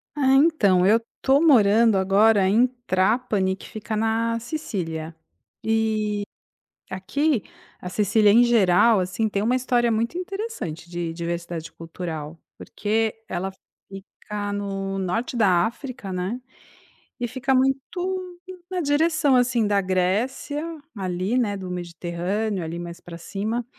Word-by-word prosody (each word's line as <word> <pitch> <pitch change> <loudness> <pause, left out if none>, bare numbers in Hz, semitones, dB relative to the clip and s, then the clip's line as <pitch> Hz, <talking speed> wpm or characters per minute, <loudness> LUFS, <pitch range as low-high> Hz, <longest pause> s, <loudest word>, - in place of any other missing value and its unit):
Ah, 270 -2 +3
então, 210 - +4
eu 220 +3 +5 0.2
tô 275 +3 +4
morando 225 -7 +5
agora 195 +1 +4
em 230 +6 +4 0.2
Trapani 190 0 +1
que - - -12
fica 215 0 -5
na 225 +1 0
Sicília. 170 - -5 0.5
E 220 -1 0 0.7
aqui, 245 +7 0 0.4
a 180 - -5
Sicília 210 +1 +3
em 235 +3 +6
geral, 225 -2 +4
assim, 185 +5 -1
tem 200 -1 -1
uma 235 +4 +2
história 245 -2 +1
muito 230 +9 -1
interessante 365 - -5
de 170 -1 -4
diversidade 170 -1 -5
cultural. 165 -1 -7 0.2
Porque 220 +1 -1
ela 190 +2 -3 0.4
fica 205 +1 -7
no 195 -1 -3
norte 225 +7 -2
da 185 -6 +4
África, 235 -4 -6
né. 185 +7 -3 0.8
E 240 - -1
fica 260 +2 -1
muito 355 +8 -1 0.3
na 370 -1 -2
direção, 295 -1 +2
assim, 245 -2 +2
da 205 -1 +2
Grécia, 200 +11 -1 0.3
ali, 185 +4 -1
né, 215 -5 +1
do 185 -1 -7
Mediterrâneo, 180 +3 -3
ali, 165 +1 -5
mais 170 0 -7
pra 170 -1 -10
cima. 215 +7 -3
210 Hz, 130 wpm, -24 LUFS, 185-245 Hz, 0.8 s, em